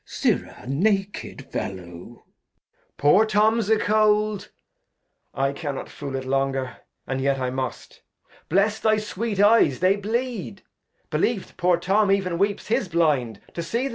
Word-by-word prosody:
Glost. -, -, -10 dB
Sirrah, -, -, 0 dB
naked 195 Hz, +8 st, -1 dB
FeUow. 95 Hz, -, -3 dB
Edg. 90 Hz, +6 st, -12 dB, 0.7 s
Poor 165 Hz, +9 st, +5 dB
Tom's 220 Hz, 0 st, +2 dB
a 220 Hz, -, +5 dB
cold; 210 Hz, -1 st, +2 dB, 0.8 s
1 135 Hz, +1 st, 0 dB
cannot 145 Hz, -3 st, -5 dB
fool 140 Hz, -2 st, -6 dB
it 130 Hz, 0 st, -4 dB
longer, 135 Hz, -1 st, -1 dB, 0.3 s
And 135 Hz, 0 st, -3 dB
yet 140 Hz, 0 st, +1 dB
I 130 Hz, -1 st, -1 dB
must. 130 Hz, -2 st, -5 dB, 0.5 s
Bless 205 Hz, +5 st, +2 dB
thy 215 Hz, -1 st, +3 dB
sweet 210 Hz, 0 st, -3 dB
Eyes, 205 Hz, -, +5 dB
they 185 Hz, +2 st, +4 dB
bleed; 220 Hz, -1 st, -3 dB, 0.5 s
Beheve't 225 Hz, -5 st, -1 dB
poor 180 Hz, -1 st, +2 dB
Tom 195 Hz, +4 st, +2 dB
ev'n 185 Hz, -3 st, +1 dB
weeps 200 Hz, +1 st, 0 dB
his 215 Hz, -3 st, 0 dB
Blind 145 Hz, -10 st, +1 dB
to 170 Hz, -, -4 dB
see 230 Hz, +10 st, -2 dB
'em. -, -, -1 dB
190 Hz, 145 wpm, -24 LUFS, 135-215 Hz, 0.8 s, Poor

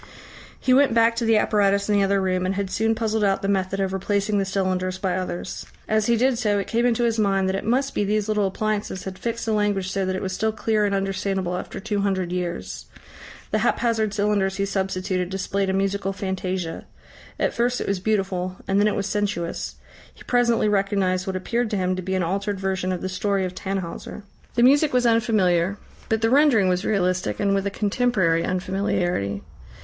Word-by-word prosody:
He 255 Hz, -, +2 dB
went 270 Hz, -3 st, +4 dB
back 230 Hz, 0 st, +4 dB
to 235 Hz, -, 0 dB
the 225 Hz, -1 st, +4 dB
apparatus 200 Hz, -2 st, +2 dB
in 210 Hz, -, +1 dB
the 200 Hz, -, +4 dB
other 195 Hz, 0 st, +2 dB
room, 185 Hz, -1 st, 0 dB
and 185 Hz, +1 st, -1 dB
had 195 Hz, -1 st, -2 dB
soon 225 Hz, +3 st, +1 dB
puzzled 220 Hz, -1 st, 0 dB
out 195 Hz, -1 st, +1 dB
the -, -, 0 dB
method 195 Hz, -1 st, 0 dB
of 190 Hz, -1 st, -1 dB
replacing 200 Hz, +2 st, 0 dB
the 195 Hz, -, 0 dB
cylinders 185 Hz, -1 st, -1 dB
by 190 Hz, -2 st, -1 dB
others. 185 Hz, -1 st, -4 dB, 0.2 s
As 215 Hz, -1 st, +1 dB
he 235 Hz, -1 st, +3 dB
did 250 Hz, 0 st, +2 dB
so, 210 Hz, -3 st, +1 dB
it 200 Hz, -, -1 dB
came 235 Hz, +2 st, +1 dB
into 240 Hz, 0 st, +1 dB
his 230 Hz, -1 st, +1 dB
mind 195 Hz, -2 st, +2 dB
that 190 Hz, -, 0 dB
it 195 Hz, -, -3 dB
must 265 Hz, +5 st, 0 dB
be -, -, 0 dB
these 210 Hz, +1 st, 0 dB
little 210 Hz, -2 st, +1 dB
appliances 205 Hz, -1 st, -2 dB
had 190 Hz, -1 st, -7 dB
fixed 230 Hz, 0 st, -3 dB
the 225 Hz, -, 0 dB
language 205 Hz, -3 st, 0 dB
so 195 Hz, 0 st, -1 dB
that 185 Hz, -, -1 dB
it 185 Hz, -, -3 dB
was 190 Hz, -1 st, -3 dB
still 220 Hz, +3 st, 0 dB
clear 215 Hz, -1 st, 0 dB
and 200 Hz, -1 st, 0 dB
understandable 195 Hz, -2 st, -1 dB
after 180 Hz, -, -6 dB
two 205 Hz, +1 st, -2 dB
hundred 190 Hz, -3 st, -1 dB
years. 180 Hz, -1 st, -4 dB, 0.6 s
The -, -, +2 dB
haphazard 225 Hz, -3 st, +1 dB
cylinders 205 Hz, -2 st, +1 dB
he 195 Hz, 0 st, 0 dB
substituted 190 Hz, -2 st, -2 dB
displayed 195 Hz, 0 st, -1 dB
a -, -, +2 dB
musical 195 Hz, 0 st, 0 dB
fantasia. 185 Hz, -3 st, -3 dB, 0.5 s
At -, -, +1 dB
first 245 Hz, +1 st, 0 dB
it -, -, -3 dB
was 195 Hz, -1 st, 0 dB
beautiful, 190 Hz, -3 st, -1 dB
and 195 Hz, +1 st, +2 dB
then 205 Hz, -, +4 dB
it 210 Hz, -, 0 dB
was 200 Hz, -, -1 dB
sensuous. 200 Hz, -4 st, -2 dB, 0.4 s
He -, -, -16 dB
presently 235 Hz, -3 st, +2 dB
recognised 195 Hz, -2 st, +1 dB
what 190 Hz, -, -2 dB
appeared 230 Hz, +5 st, -1 dB
to 210 Hz, -, -1 dB
him 185 Hz, 0 st, 0 dB
to 185 Hz, -, -4 dB
be 190 Hz, +1 st, -2 dB
an 185 Hz, -, +1 dB
altered 195 Hz, +3 st, -2 dB
version 190 Hz, -1 st, -1 dB
of 180 Hz, -, -3 dB
the -, -, -2 dB
story 195 Hz, +1 st, 0 dB
of 180 Hz, -, -5 dB
Tannhauser. 190 Hz, +1 st, -5 dB, 0.3 s
The 240 Hz, -, +3 dB
music 285 Hz, +3 st, +5 dB
was 250 Hz, -1 st, +3 dB
unfamiliar. 200 Hz, -5 st, +2 dB, 0.3 s
But 220 Hz, 0 st, +1 dB
the 225 Hz, +1 st, +2 dB
rendering 265 Hz, -9 st, +5 dB
was 180 Hz, +1 st, 0 dB
realistic, 185 Hz, -3 st, 0 dB
and 200 Hz, -1 st, +2 dB
with 195 Hz, 0 st, 0 dB
a -, -, +1 dB
contemporary 200 Hz, -5 st, +1 dB
unfamiliarity. 180 Hz, -, -1 dB
195 Hz, 210 wpm, -23 LUFS, 185-215 Hz, 0.6 s, music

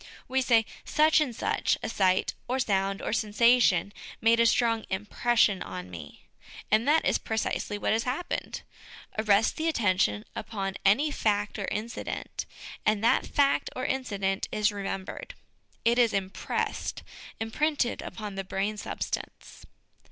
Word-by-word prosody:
We 265 Hz, +1 st, +1 dB
say, 230 Hz, -3 st, +4 dB, 0.2 s
" -, -, -32 dB, 0.2 s
Such 310 Hz, 0 st, +6 dB
and 255 Hz, -6 st, -1 dB
such -, -, 0 dB
a -, -, -1 dB
sight 190 Hz, -4 st, +2 dB
or 255 Hz, +2 st, 0 dB
sound, 195 Hz, -5 st, 0 dB
or -, -, -2 dB
sensation, 215 Hz, -3 st, +3 dB, 0.3 s
made 230 Hz, +1 st, +4 dB
a 230 Hz, -, +5 dB
strong 230 Hz, -1 st, +2 dB
impression 210 Hz, +1 st, +1 dB
on 90 Hz, -1 st, -7 dB
me." 85 Hz, -, -10 dB, 0.5 s
And 220 Hz, +4 st, +3 dB
that 315 Hz, +2 st, +4 dB
is -, -, +2 dB
precisely 220 Hz, -1 st, -2 dB
what 205 Hz, -, 0 dB
has 225 Hz, -, +2 dB
happened: 265 Hz, +9 st, -3 dB, 0.6 s
arrest 215 Hz, 0 st, +3 dB
the 320 Hz, 0 st, -1 dB
attention 185 Hz, -, +1 dB
upon 195 Hz, -2 st, -4 dB
any 260 Hz, +11 st, +4 dB
fact 205 Hz, -4 st, 0 dB
or 200 Hz, -, -2 dB
incident, 220 Hz, +4 st, -4 dB, 0.4 s
and 215 Hz, 0 st, +1 dB
that 230 Hz, -, +3 dB
fact 280 Hz, -1 st, +2 dB
or 255 Hz, -, -3 dB
incident 200 Hz, -7 st, -1 dB
is 210 Hz, 0 st, +2 dB
remembered; 195 Hz, -2 st, -5 dB, 0.5 s
it 235 Hz, +1 st, +4 dB
is 235 Hz, -2 st, +4 dB
impressed, 195 Hz, -1 st, -2 dB, 0.4 s
imprinted 245 Hz, +4 st, 0 dB
upon 210 Hz, -2 st, -6 dB
the 195 Hz, 0 st, -4 dB
brain 195 Hz, +3 st, -2 dB
substance. -, -, -6 dB
215 Hz, 145 wpm, -28 LUFS, 195-240 Hz, 0.6 s, Such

